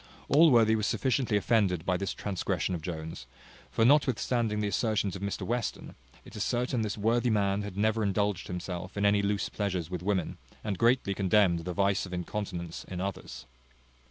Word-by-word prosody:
Allworthy 125 -7 +6
was 110 -2 0
sufficiently 130 -5 +1
offended 100 -5 +1
by 90 - +1
this 100 +2 -3
transgression 95 -2 -2
of 85 - -3
Jones; 80 -6 -6 0.4
for 115 - +2
notwithstanding 120 -5 +2
the 105 - 0
assertions 100 -1 0
of 95 - -7
Mr 100 0 -3
Western, 120 -1 -3 0.3
it - - -13
is 105 - -1
certain 125 0 0
this 105 -1 -2
worthy 115 +4 +2
man 100 -2 +1
had 100 -2 -7
never 110 +2 +1
indulged 100 -2 0
himself 90 +1 -5
in 100 - +1
any 100 0 +4
loose 100 0 0
pleasures 90 -5 -3
with 90 -2 -3
women, 95 -2 -1 0.2
and 100 -4 -3
greatly 115 -4 +3
condemned 95 -3 +3
the 90 - -3
vice 100 +1 +1
of 90 - -9
incontinence 90 -2 -4
in 90 - -6
others. 95 -7 -5
100 Hz, 175 wpm, -29 LUFS, 90-110 Hz, 0.4 s, Allworthy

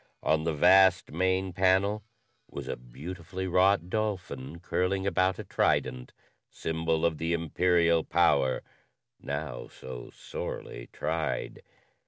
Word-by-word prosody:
On 80 0 +2
the 80 - +1
vast 95 +3 +5
main 95 +3 0
panel 95 +3 +2 0.5
was - - -7
a - - -2
beautifully 85 +10 -7
wrought 95 0 +3
dolphin 90 -9 -3
curling 95 +2 -1
about 95 -1 +2
a - - -5
trident 65 -1 0 0.4
symbol 80 0 -1
of 80 -2 0
the 85 +1 0
imperial 85 0 +2
power 70 -6 +2 0.6
now 70 -4 -5
so 60 -2 -9
sorely - - -7
tried. 80 -1 -3
85 Hz, 115 wpm, -29 LUFS, 80-95 Hz, 0.6 s, vast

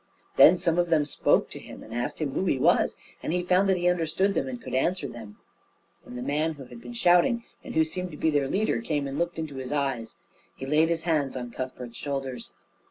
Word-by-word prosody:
Then 180 - +8
some 170 0 +1
of 175 -1 +1
them 155 -3 +3
spoke 145 - +1
to - - -7
him - - -11
and 110 - -11
asked 120 +1 -2
him 150 -4 -2
who 185 - -1
he 140 - +2
was, - - +3 0.3
and - - -3
he 180 +1 0
found 185 +2 +3
that 190 - +3
he 175 0 0
understood 180 +3 +1
them 135 - -1
and 125 -2 -5
could - - -8
answer 170 +8 0
them; 110 -3 -10 0.7
and 125 - -9
the 125 - -4
man 150 +4 0
who 140 -3 -10
had 235 - -12
been 240 - -9
shouting, 230 +2 +3 0.2
and - - -8
who 160 - +5
seemed 180 +3 -4
to 150 - -10
be 160 - +1
their 145 -2 +1
leader, 210 +9 0
came 150 -10 -1
and 135 +1 -4
looked 170 0 -1
into 155 -4 -5
his 130 -1 -5
eyes. 135 -6 -2 0.4
He 135 - -7
laid 155 +4 +3
his 165 -1 -1
hands 150 -6 0
on 120 -1 -5
Cuthbert's 125 -2 -6
shoulders. 135 -4 -4
155 Hz, 235 wpm, -27 LUFS, 135-175 Hz, 0.7 s, Then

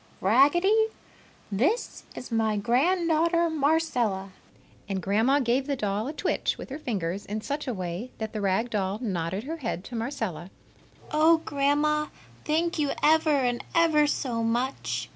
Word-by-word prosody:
Raggedy, 345 - +4 0.6
this 295 - -1
is 250 - -8
my 220 -2 +1
grand 285 - +2
daughter, 335 +1 +2
Marcella!" 275 -11 0 0.6
And 195 -1 -1
Grandma 220 - +2
gave 260 +1 +1
the 280 - 0
doll 210 -1 -2
a 295 - -4
twitch - - -1
with - - -9
her 285 - -5
fingers 195 - -3
in 215 +1 -3
such 285 +5 -4
a 250 - -1
way 185 +5 -4
that 220 -1 -5
the 215 - -3
rag 200 +5 0
doll 195 -1 -1
nodded 190 -3 -2
her 320 +5 -5
head 230 - -4
to 240 - -8
Marcella. 225 - -4 0.6
"Oh, 320 +1 +4
Grandma! 295 +1 +1 0.4
Thank 330 +2 0
you 290 -2 +1
ever 315 +1 +4
and 255 -5 +1
ever 315 -3 +4
so 245 -5 -1
much!" 240 +4 -1
255 Hz, 155 wpm, -27 LUFS, 210-305 Hz, 0.6 s, Raggedy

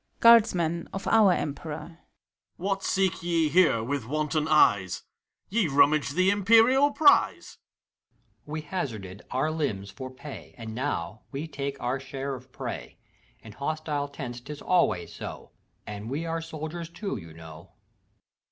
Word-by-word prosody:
GUABDSHEK 185 -8 +5
(of 195 - -5
OUr 220 -4 +6
EliPEBOR). 155 +3 -5 0.6
What 195 +2 -1
seek 190 -2 +1
ye 165 -2 +1
here 155 -8 +4
with 130 -1 -3
wanton 155 +2 0
eyesT 100 - +3 0.5
Ye 210 -3 +2
rummage 145 0 +3
the 185 +3 +3
Imperial 230 +7 +5
prize! 290 0 +3 0.5
HAVEQUICK. - - -40
We 155 +1 -4
hazarded 110 - -5
our 135 +5 0
limbs 105 -12 -2
for 130 +6 -7
pay, 130 +3 -10
And 110 -2 -7
now 110 -6 -3
we 145 +3 -4
take 140 -2 -5
our 125 +2 -1
share 135 +1 -5
of 130 0 -10
prey. - - -6 0.4
In 110 - -11
hostile 145 +3 -3
tents 130 -4 -7
't 135 - -9
is 150 - -8
always 90 - +1
so, - - -8 0.3
And 105 +1 -6
we 150 +5 -3
are 165 0 -2
soldiers 160 +1 -6
too, 195 +4 -4
you 85 -5 -10
know. 80 0 -12
150 Hz, 145 wpm, -27 LUFS, 125-170 Hz, 0.6 s, OUr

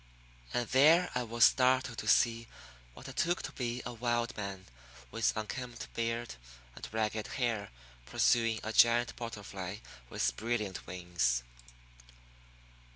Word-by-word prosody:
And 120 -1 -1
there 155 +7 +5
I 125 - 0
was 120 -1 +1
startled 130 -2 +3
to 110 - -5
see 115 +1 +3 0.5
what - - -11
I - - -6
took 175 +1 0
to - - -5
be 120 -1 -3
a 125 - -5
wild 120 0 -1
man, 100 -2 -6 0.5
with 115 -1 +1
unkempt 120 +2 -6
beard 115 +1 -2 0.4
and - - -9
ragged 110 -1 -1
hair, 115 -6 -1 0.4
pursuing 115 -2 +2
a 110 - -3
giant 120 +1 +4
butterfly 100 -5 -6 0.3
with - - 0
brilliant 110 -4 -3
wings. 85 -10 0
115 Hz, 130 wpm, -32 LUFS, 105-120 Hz, 0.5 s, there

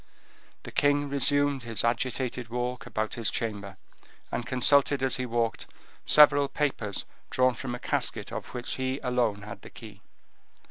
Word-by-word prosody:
The - - -8
king 145 0 +2
resumed 140 0 +2
his 115 -2 -1
agitated 120 0 -1
walk 125 +1 -3
about 110 -2 -2
his 115 -2 -1
chamber, 100 -4 -4 0.5
and 120 - -3
consulted, 135 +2 +4
as 130 - +2
he 125 -1 -3
walked, 115 -1 -1 0.4
several 145 -1 +7
papers 130 -9 -2 0.2
drawn 130 0 +3
from 120 +1 -5
a - - -8
casket - - -2
of - - -6
which 120 -1 -4
he 130 +1 -2
alone 120 -5 0
had 105 - -9
the - - -11
key. 105 -3 -12
125 Hz, 150 wpm, -28 LUFS, 115-135 Hz, 0.5 s, several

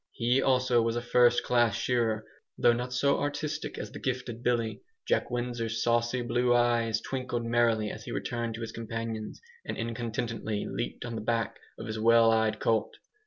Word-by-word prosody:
He, 125 +3 +2
also, 130 -2 +3
was 115 0 0
a 120 - -1
first 120 0 +4
class 120 -4 +3
shearer, 115 -3 0 0.3
though 120 - +5
not 125 +1 -3
so 140 +3 +2
artistic 145 +1 -3
as - - -6
the - - -8
gifted 125 -2 -3
Billy. 115 -4 0 0.3
Jack - - +1
Windsor's 120 -2 -2
saucy 120 +1 +1
blue 120 +1 +2
eyes 120 -2 +2
twinkled 125 -3 -3
merrily 115 -2 +2
as - - -9
he - - -6
returned 115 -2 -3
to 115 - -7
his 115 -1 -4
companions, 115 -1 -5 0.2
and - - -5
incontinently 115 -2 -3
leaped - - -4
on 120 - -5
the 115 - -4
back 115 0 -1 0.2
of - - -7
his 110 0 -4
wild 115 0 +5
eyed 110 -1 +1
colt. 115 -2 +1
115 Hz, 175 wpm, -29 LUFS, 115-120 Hz, 0.3 s, though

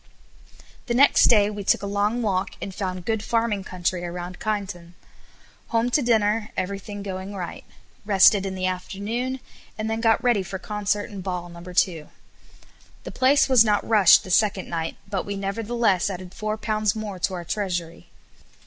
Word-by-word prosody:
The 235 - 0
next 275 +3 +6
day 210 -3 +5
we 205 -1 -6
took 195 - +2
a - - -2
long 205 +4 0
walk; 195 -2 -1
and 195 - -6
found 185 -2 -4
good 220 -2 0
farming 225 -3 0
country 180 -1 -2
around 175 +1 -6
Kyneton. 190 -5 -4 0.7
Home 230 +1 0
to 295 - +3
dinner, 220 -2 +1
everything 200 +2 -4
going 190 0 -6
right. 175 -3 -6 0.4
Rested 200 0 +5
in 195 -1 -4
the 185 0 -2
afternoon, 210 +8 -3 0.4
and 220 0 -2
then 225 0 -2
got 225 -1 +3
ready 240 -5 +3
for 190 +1 -5
concert 210 +1 -2
and 200 -2 -7
ball 180 -1 -4
No. 170 0 -11
2. 175 -3 0 0.9
The - - -7
place 265 +2 +3
was 255 -4 +6
not 210 -2 +1
rushed 210 -5 +6
the 185 - -7
second 200 -1 +2
night, 165 -1 -3
but 195 -2 -2
we 200 - -5
nevertheless 205 0 0
added 185 -1 -7
four 215 0 -3
pounds 215 -1 0
more 210 -4 -5
to 185 +1 -1
our 175 -1 -6
treasury. 175 -4 -4
200 Hz, 170 wpm, -24 LUFS, 185-215 Hz, 0.9 s, next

